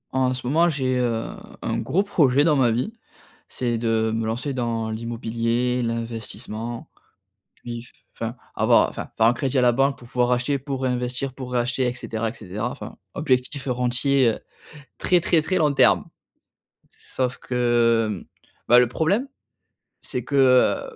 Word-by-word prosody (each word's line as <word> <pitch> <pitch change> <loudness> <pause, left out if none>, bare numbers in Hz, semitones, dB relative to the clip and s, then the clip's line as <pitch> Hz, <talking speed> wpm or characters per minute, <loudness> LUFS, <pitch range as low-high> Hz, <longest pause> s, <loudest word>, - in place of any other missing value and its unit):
En 130 -1 +2
ce 130 - -7
moment 165 +7 +3
j'ai, 130 -4 0
heu, 115 -2 0 0.4
un - - -1
gros 195 +4 +1
projet 145 -9 +3
dans 155 -1 +4
ma 130 -4 +4
vie, 125 - -1 0.6
c'est 120 -2 -2
de 110 -1 +1
me 110 0 -1
lancer 125 +5 -2
dans 115 -3 -2
l'immobilier, 115 +2 -1
l'investissement, 115 0 -4 0.7
puis, 120 -1 -7
f - - -15 0.2
enfin 115 +1 -4 0.2
avoir, - - +4
enfin, - - -7
faire 110 - +4
un 120 - +4
crédit 135 +1 -1
à - - +4
la 120 -1 +4
banque 135 +2 +2
pour 120 - -14
pouvoir 125 0 +1
acheter, 130 +3 +1
pour 135 -1 -5
réinvestir, 125 +1 -2
pour 130 -2 -8
réacheter, 125 +1 0
et 125 - -1
cetera, 115 -2 -3
et - - -8
cetera, 105 -3 -4
enfin, - - -8 0.2
objectif 130 -1 -1
heu - - +1
rentier, 125 +1 +2
heu - - -11 0.6
très, 180 -1 +3
très, 165 -1 +2
très 185 +4 -1
long 150 -5 +2
terme. - - +4 0.9
Sauf 125 -1 -3
que, 120 -2 +2
hem, 100 -4 -5 0.4
bah 120 - +8
le 125 - +3
problème 190 - 0 0.7
c'est 125 - -4
que, 140 - -4
heu, 130 -2 +5
125 Hz, 170 wpm, -23 LUFS, 115-135 Hz, 0.9 s, bah